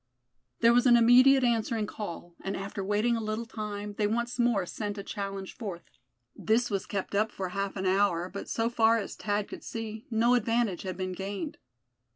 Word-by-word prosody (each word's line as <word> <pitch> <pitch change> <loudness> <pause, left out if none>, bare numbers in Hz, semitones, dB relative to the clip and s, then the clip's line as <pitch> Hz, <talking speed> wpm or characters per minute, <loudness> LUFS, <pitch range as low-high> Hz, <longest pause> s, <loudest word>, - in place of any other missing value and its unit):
There 230 0 +6
was 245 +1 +4
an 240 -1 +7
immediate 255 +3 +6
answering 230 -2 +1
call, 175 -5 -7
and 195 - -3
after 195 0 -5
waiting 210 +4 +1
a 230 - -2
little 215 +2 -3
time, 210 -2 -5
they 210 - +3
once 235 +3 -2
more 235 -6 +2
sent 205 +3 -4
a 200 - -5
challenge 195 -1 -5
forth. 195 -7 -6 0.5
This 230 +2 +1
was 195 -1 -2
kept 200 -1 -3
up 215 +2 +1
for 190 -2 -4
half 195 +1 -3
an 190 -1 -3
hour, 185 -2 +2
but 200 +2 -7
so 225 0 0
far 230 -1 +3
as 205 - -4
Thad 205 0 -1
could - - -9
see, 220 -1 -6
no 235 +1 +3
advantage 230 -5 +1
had 185 -2 -5
been 185 -1 -3
gained. 200 - -5
210 Hz, 195 wpm, -29 LUFS, 195-230 Hz, 0.5 s, an